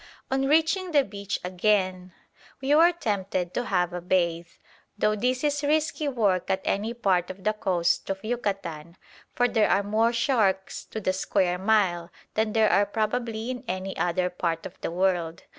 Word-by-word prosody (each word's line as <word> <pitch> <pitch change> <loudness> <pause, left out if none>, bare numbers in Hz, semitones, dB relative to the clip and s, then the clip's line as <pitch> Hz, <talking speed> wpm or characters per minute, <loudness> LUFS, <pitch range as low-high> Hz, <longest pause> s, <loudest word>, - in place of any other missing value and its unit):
On 270 0 +1
reaching 325 +4 +2
the 285 -2 +5
beach 200 -3 -5
again, 185 0 0 0.5
we 275 +1 +1
were 330 +3 +6
tempted 200 - -2
to 245 - -2
have 180 -4 0
a 180 - -4
bathe, 170 -2 0 0.5
though 215 +1 +2
this 250 +5 -1
is 290 -1 +1
risky 305 +1 0
work 205 -10 +1
at 190 0 0
any 210 +3 0
part 185 -6 +1
of 185 0 -9
the 215 - +2
coast 185 -5 0
of 195 0 -3
Yucatan, 190 -8 -4 0.4
for 245 - +3
there 225 -3 +2
are 200 - +3
more 220 +3 +2
sharks 220 -6 0
to 220 - -6
the 185 -3 0
square 185 -1 0
mile 190 -4 +1 0.2
than 220 0 0
there 220 -1 +4
are 200 +3 +3
probably 225 +2 -2
in 250 - -6
any 185 +1 -3
other 180 +1 0
part 165 -2 -2
of 185 - -7
the - - -2
world. 175 -2 -1
200 Hz, 175 wpm, -26 LUFS, 180-235 Hz, 0.5 s, were